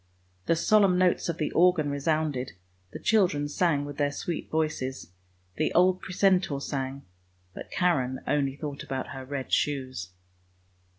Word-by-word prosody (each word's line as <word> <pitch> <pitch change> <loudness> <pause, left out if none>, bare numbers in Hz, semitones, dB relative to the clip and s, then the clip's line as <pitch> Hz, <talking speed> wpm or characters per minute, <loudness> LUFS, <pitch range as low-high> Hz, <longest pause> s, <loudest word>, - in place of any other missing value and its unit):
The 165 - +4
solemn 195 +2 +4
notes 180 -1 +2
of 170 - -2
the 150 - -1
organ 170 -4 +3
resounded, 145 -2 -1 0.4
the - - -7
children 180 -9 +2
sang 145 -2 +1
with 145 -1 -8
their 145 -1 +1
sweet 165 +3 -4
voices, 150 - -2 0.5
the 155 - +1
old 185 +1 +4
precentor 185 -5 +1
sang, 135 0 -4 0.5
but - - -9
Karen 130 -8 +1
only 140 -2 0
thought 145 -1 -6
about 135 -1 -4
her 135 -1 -7
red 135 0 -5
shoes. 130 -10 -1
150 Hz, 140 wpm, -27 LUFS, 135-175 Hz, 0.5 s, The